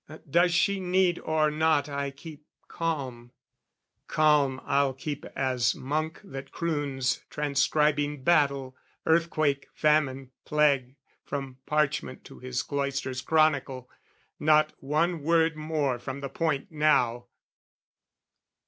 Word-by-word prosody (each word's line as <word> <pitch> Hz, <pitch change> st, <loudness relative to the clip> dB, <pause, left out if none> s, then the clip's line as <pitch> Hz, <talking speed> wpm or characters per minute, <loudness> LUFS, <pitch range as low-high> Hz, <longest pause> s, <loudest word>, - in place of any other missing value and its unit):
Does 175 Hz, +5 st, +3 dB
she 200 Hz, +3 st, +2 dB
need 180 Hz, -1 st, +2 dB
or 155 Hz, -1 st, +1 dB
not 155 Hz, -1 st, +2 dB
I 140 Hz, -1 st, -3 dB
keep 150 Hz, +2 st, -12 dB, 0.2 s
calm? 130 Hz, -8 st, -4 dB, 0.7 s
Calm 150 Hz, -4 st, +3 dB
I'll 140 Hz, -1 st, +2 dB
keep 145 Hz, +1 st, -5 dB
as 125 Hz, -3 st, +1 dB
monk 155 Hz, +4 st, -3 dB
that 135 Hz, -9 st, -9 dB
croons 145 Hz, -6 st, -1 dB
Transcribing 150 Hz, 0 st, +1 dB
battle, 140 Hz, -5 st, +2 dB, 0.3 s
earthquake, 155 Hz, -4 st, +1 dB
famine, 135 Hz, -4 st, +1 dB
plague, 140 Hz, -4 st, +2 dB, 0.3 s
From 135 Hz, -2 st, -6 dB
parchment 150 Hz, -3 st, -1 dB
to -, -, -13 dB
his 125 Hz, 0 st, -3 dB
cloister's 140 Hz, -2 st, -2 dB
chronicle. 140 Hz, -4 st, +1 dB, 0.5 s
Not 155 Hz, 0 st, +4 dB
one 155 Hz, +4 st, 0 dB
word 165 Hz, +1 st, +2 dB
more 155 Hz, -5 st, -1 dB
from 130 Hz, +3 st, -6 dB
the 140 Hz, -, -4 dB
point 155 Hz, +3 st, -2 dB
now! 125 Hz, -6 st, +2 dB
145 Hz, 110 wpm, -27 LUFS, 135-155 Hz, 0.7 s, Not